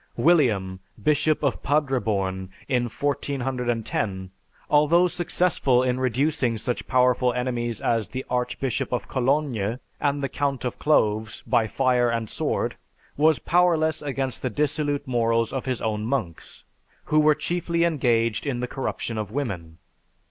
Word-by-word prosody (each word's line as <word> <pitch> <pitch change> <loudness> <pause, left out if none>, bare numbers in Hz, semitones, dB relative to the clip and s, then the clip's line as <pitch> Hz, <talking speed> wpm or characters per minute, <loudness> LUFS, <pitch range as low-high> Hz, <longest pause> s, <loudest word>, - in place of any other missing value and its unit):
William, 110 - +2 0.2
Bishop 150 0 +2
of 140 - 0
Padreborn, 110 -10 0 0.2
in 125 -2 +1
1410, 120 -8 -2 0.4
although 150 +4 +4
successful 170 -7 +1
in 125 0 0
reducing 130 -1 0
such 120 +2 -3
powerful 125 -1 +3
enemies 120 -3 -2
as 115 -3 +1
the 130 +1 -6
Archbishop 125 +1 -2
of 125 - -2
Cologne, 130 -5 0 0.2
and 145 -1 0
the - - +1
Count 140 -1 -2
of 125 - -4
Cloves 110 -7 +1
by 110 - +2
fire 125 -1 +2
and 115 -2 -2
sword, - - -1 0.4
was 155 0 +4
powerless 165 -3 +2
against 135 -3 -3
the 130 - -1
dissolute 145 +2 -1
morals 115 -2 +1
of 135 - -3
his 130 -3 -2
own 105 -1 -1
monks, 110 - -4 0.4
who 155 - +2
were 155 0 +5
chiefly 170 0 -1
engaged 115 -8 +1
in 125 -3 -1
the 125 - -2
corruption 120 -3 -3
of 105 -2 -4
women. 95 - -4
125 Hz, 135 wpm, -24 LUFS, 115-145 Hz, 0.4 s, were